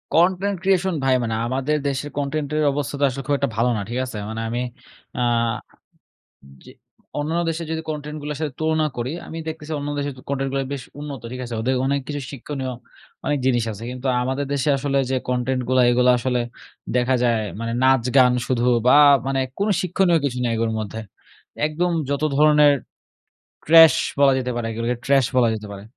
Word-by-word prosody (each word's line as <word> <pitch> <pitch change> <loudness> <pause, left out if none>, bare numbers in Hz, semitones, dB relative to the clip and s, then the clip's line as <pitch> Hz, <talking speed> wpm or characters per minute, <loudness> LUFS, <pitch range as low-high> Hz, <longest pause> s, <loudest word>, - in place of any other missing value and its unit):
Content 185 +4 +2
creation 190 -1 +2
ভাই 135 - +3
মানে 115 -1 -2
আমাদের 135 +4 0
দেশের 140 +2 -3
কনটেন্টের 150 +1 -1
অবস্থা 145 0 -3
তো - - 0
আসলে 135 +1 -6
খুব 145 - +2
একটা 140 - 0
ভালো 120 +2 +2
না, 100 - -2
ঠিক 120 +2 -2
আছে? 115 -4 -7
মানে 110 0 -4
আমি 120 +2 -2 0.6
আ 125 - +1 1.4
যে - - -13 0.5
অন্যান্য 160 +4 -1
দেশের 165 0 -4
যদি 160 0 -2
কনটেন্টগুলার 150 -1 -5
সাথে 150 -4 -2
তুলনা 155 -1 +1
করি, 120 +4 -2 0.2
আমি 165 - -7
দেখতেছি 155 -1 -6
অন্য 145 - -4
দেশের 145 0 -2
তু - - -12
কনটেন্ট 135 -1 -1
গুলা 135 - 0
বেশ 135 - -5 0.2
উন্নত, 145 -2 -6
ঠিক 125 - -6
আছে? 120 - -7
ওদের 130 +3 0
অনেক 140 +1 +1
কিছু 145 -1 -4
শিক্ষণীয় 130 -1 -5 0.5
অনেক 145 - 0
জিনিস 120 -3 +2
আছে। 105 +1 -9
কিন্তু 125 +1 -5 0.2
আমাদের 130 +2 -2
দেশে 140 +1 0
আসলে 140 0 -1
যে - - +1
কনটেন্টগুলা, 125 0 +1
এগুলা 125 +1 +4
আসলে 125 0 0 0.6
দেখা 125 +1 +2
যায় 115 -2 +2 0.2
মানে 115 0 -3
নাচ-গান 130 -1 +4 0.2
শুধু। 120 -2 0 0.2
বা 130 - +7 0.3
মানে 135 0 0 0.2
কোনো 205 +1 +1
শিক্ষণীয় 180 -1 +2
কিছু 125 -3 -2
নেই 115 -1 0
ওর 115 - 0
মধ্যে। 110 +1 -5 0.7
একদম 175 +3 -1 0.2
যত 140 +1 -1
ধরনের 150 -1 +6 0.9
trash 165 0 +8 0.2
বলা 140 -1 +6
যেতে 125 -1 -2
পারে 120 - -2
এগুলোকে 115 +2 -2
trash 135 -3 +3
বলা 120 -2 +4
যেতে 105 -1 -7
পারে। 100 -1 -8
135 Hz, 180 wpm, -22 LUFS, 125-150 Hz, 1.4 s, trash